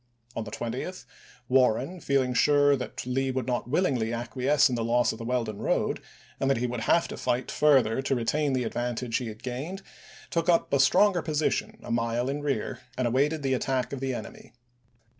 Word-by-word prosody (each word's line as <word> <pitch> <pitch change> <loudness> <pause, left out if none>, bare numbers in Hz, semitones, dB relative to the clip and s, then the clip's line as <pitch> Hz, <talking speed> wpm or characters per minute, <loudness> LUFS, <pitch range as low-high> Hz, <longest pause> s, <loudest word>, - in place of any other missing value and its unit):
On 115 - -2
the 110 - -7
20th, 120 - -5 0.4
Warren, 130 +6 +2
feeling 135 -4 +1
sure 145 +2 +4
that 125 -2 -6
Lee 135 +1 0
would 130 -2 -2
not 125 -1 -2
willingly 130 -8 +1
acquiesce 130 +5 +2
in 130 - -3
the 115 -1 -1
loss 120 +1 +2
of 110 - -8
the - - -6
Weldon 115 -3 -2
road, - - 0 0.4
and 135 - +1
that 135 - +3
he 120 - -1
would 125 -1 -3
have 165 +9 +2
to - - -5
fight 120 +1 -1
further 135 -5 +3
to 135 0 0
retain 140 +4 0
the 130 -1 +1
advantage 120 0 -2
he 125 - -4
had 110 +2 -9
gained, 145 +10 -5 0.5
took 165 +1 0
up 170 -4 +2
a 140 - +4
stronger 180 +7 +4
position 155 -1 -1
a - - -6
mile 115 +2 0
in 145 +2 -2
rear, 145 -2 -2 0.2
and 130 - +1
awaited 145 +5 +1
the 135 -1 +1
attack 130 0 -1
of 140 - -4
the 135 -1 -2
enemy. - - -9
130 Hz, 195 wpm, -27 LUFS, 120-145 Hz, 0.5 s, sure